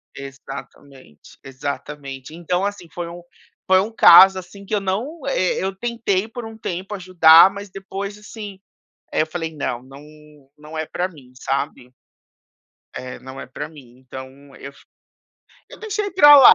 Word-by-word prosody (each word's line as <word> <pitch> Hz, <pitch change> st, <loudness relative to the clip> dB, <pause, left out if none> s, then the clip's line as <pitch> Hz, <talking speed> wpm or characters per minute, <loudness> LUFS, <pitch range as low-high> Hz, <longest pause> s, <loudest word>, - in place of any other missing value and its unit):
Exatamente, 135 Hz, -, -11 dB
exatamente. 140 Hz, 0 st, -6 dB
Então, 180 Hz, +2 st, -1 dB
assim, 205 Hz, -4 st, -5 dB
foi 175 Hz, -1 st, -4 dB
um 175 Hz, +1 st, -9 dB, 0.5 s
foi 185 Hz, 0 st, +6 dB
um 205 Hz, +4 st, -1 dB
caso, 190 Hz, -3 st, +8 dB
assim, 200 Hz, +2 st, -10 dB
que 210 Hz, -, -1 dB
eu 205 Hz, -, 0 dB
não, 225 Hz, -, -3 dB
eh, 185 Hz, -10 st, 0 dB
eu 190 Hz, 0 st, -1 dB
tentei 220 Hz, -2 st, -1 dB
por 235 Hz, +2 st, -7 dB
um 225 Hz, 0 st, -9 dB
tempo 190 Hz, -1 st, -5 dB
ajudar, 180 Hz, -2 st, +7 dB
mas 200 Hz, +1 st, -9 dB
depois, 195 Hz, +1 st, -6 dB
assim, 210 Hz, -2 st, -9 dB, 0.5 s
eh, -, -, +2 dB
eu -, -, -7 dB
falei: 160 Hz, 0 st, -4 dB
"Não, 125 Hz, -5 st, -3 dB
não, 135 Hz, +2 st, -13 dB, 0.6 s
não 150 Hz, +1 st, -10 dB
é 155 Hz, -, -2 dB
pra 180 Hz, +4 st, -3 dB
mim, 135 Hz, -7 st, -17 dB
sabe? 135 Hz, -1 st, -3 dB, 1.0 s
É, 130 Hz, 0 st, -7 dB
não 130 Hz, +1 st, -10 dB
é -, -, -7 dB
pra 150 Hz, +4 st, -7 dB
mim. 130 Hz, -6 st, -16 dB
Então 130 Hz, +2 st, -12 dB
eu 140 Hz, -, -9 dB
fa -, -, -20 dB, 0.9 s
eu -, -, -12 dB
deixei 425 Hz, -2 st, -3 dB
pra 295 Hz, -5 st, +8 dB
lá! 265 Hz, -, +10 dB
175 Hz, 165 wpm, -21 LUFS, 140-200 Hz, 1.0 s, lá